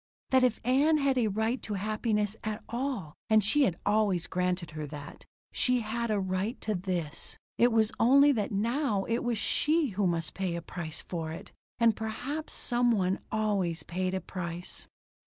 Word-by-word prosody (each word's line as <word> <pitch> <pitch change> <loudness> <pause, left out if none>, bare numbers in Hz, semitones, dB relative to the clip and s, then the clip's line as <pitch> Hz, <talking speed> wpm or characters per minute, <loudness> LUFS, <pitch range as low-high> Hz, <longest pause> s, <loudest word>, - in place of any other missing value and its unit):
That 260 -1 +5
if 245 -3 +2
Ann 285 +5 +4
had 275 -2 +2
a 230 - +2
right 220 +5 0
to 210 - -4
happiness 210 +1 0
at 215 0 -4
all 235 - -3 0.2
and 215 -1 +5
she 285 +8 +4
had 175 -8 -1
always 205 -5 +2
granted 180 -1 -1
her 155 -1 -5
that 145 -1 -9 0.3
she 250 -1 +2
had 230 +2 -2
a 210 -2 +1
right 190 +5 -2
to 215 - -1
this. 175 -5 -3 0.2
It 240 +1 +5
was 220 -1 +3
only 280 +5 +6
that 215 -7 -1
now 220 +1 0
it 230 +3 0
was 240 -2 0
she 305 +7 +2
who 200 -1 0
must 165 -3 -1
pay 185 -3 -2
a 170 - -3
price 165 -3 -5
for 165 -3 -4
it. 160 - -8 0.3
And 230 -2 +4
perhaps 260 +8 -4
some 245 0 +2
one 190 -3 +1
always 195 -7 0
paid 185 +3 -2
a 190 - -2
price. 175 -1 -5
"Ann?" - - -33
215 Hz, 185 wpm, -29 LUFS, 185-240 Hz, 0.3 s, only